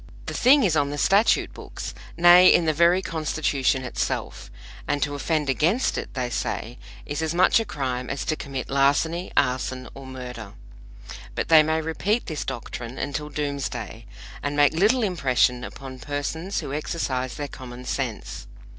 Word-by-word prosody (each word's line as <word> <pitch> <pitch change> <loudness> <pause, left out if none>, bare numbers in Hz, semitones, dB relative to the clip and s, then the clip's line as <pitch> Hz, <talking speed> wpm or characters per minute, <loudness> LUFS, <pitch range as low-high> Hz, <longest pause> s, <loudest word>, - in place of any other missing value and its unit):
The - - -5
thing 270 +3 +5
is 180 -6 +2
on 145 -2 +2
the 145 - -4
statute 200 +8 +3
books - - -7 0.2
nay, 175 +1 +8
in 170 - +4
the 155 - +2
very 170 +4 +4
Constitution 150 -5 0
itself 125 - -3 0.4
and 145 0 0
to 145 - -2
offend 150 +1 -1
against 165 - +1
it, - - -5
they 125 -2 -2
say, 120 +1 -3 0.3
is 145 +1 -3
as 160 +1 -1
much 185 +5 +5
a 225 - -2
crime 130 - -3
as 135 - -3
to 155 - 0
commit 135 -4 -6
larceny, 145 +6 +1
arson 130 -1 0
or 135 -1 -10
murder. 125 -5 -8 0.8
But - - -2
they 160 -1 +8
may 160 +1 0
repeat 195 +8 -1
this 155 -3 -4
doctrine 120 -1 -6
until 150 +1 -3
Doomsday, 140 -6 -4 0.3
and 145 0 -3
make 145 +1 +5
little 215 +9 +3
impression 125 - +1
upon 130 0 -8
persons 145 - -3
who 140 -3 -6
exercise 130 -5 -2
their 145 +2 -4
common 125 -2 -10
sense. 125 -4 -4
145 Hz, 165 wpm, -24 LUFS, 130-165 Hz, 0.8 s, nay